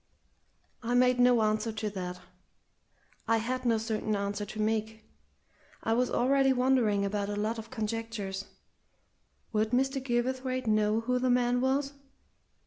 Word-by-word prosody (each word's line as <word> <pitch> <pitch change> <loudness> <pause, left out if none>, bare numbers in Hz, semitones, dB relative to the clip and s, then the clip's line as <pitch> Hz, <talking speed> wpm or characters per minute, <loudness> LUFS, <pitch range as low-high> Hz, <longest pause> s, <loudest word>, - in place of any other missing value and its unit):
I 240 +1 -1
made 250 0 +4
no 245 -2 +5
answer 215 +1 0
to 215 -1 -3
that. 180 -2 -5 1.1
I 230 0 +3
had 255 +3 -3
no 230 -1 +3
certain 220 -1 -2
answer 200 +1 -2
to 215 - -8
make. 220 0 -1 0.8
I 225 - +1
was 250 +2 +1
already 270 +2 +3
wondering 250 -6 +2
about 200 0 -2
a 205 - -2
lot 215 +2 -2
of 225 +1 -9
conjectures. 220 -4 -4 1.1
Would 215 0 +1
Mr. 270 +3 +1
Gilverthwaite 255 +1 -1
know 215 0 +2
who 250 +2 0
the 255 0 +1
man 245 0 +2
was? 275 +2 0
225 Hz, 140 wpm, -29 LUFS, 215-250 Hz, 1.1 s, no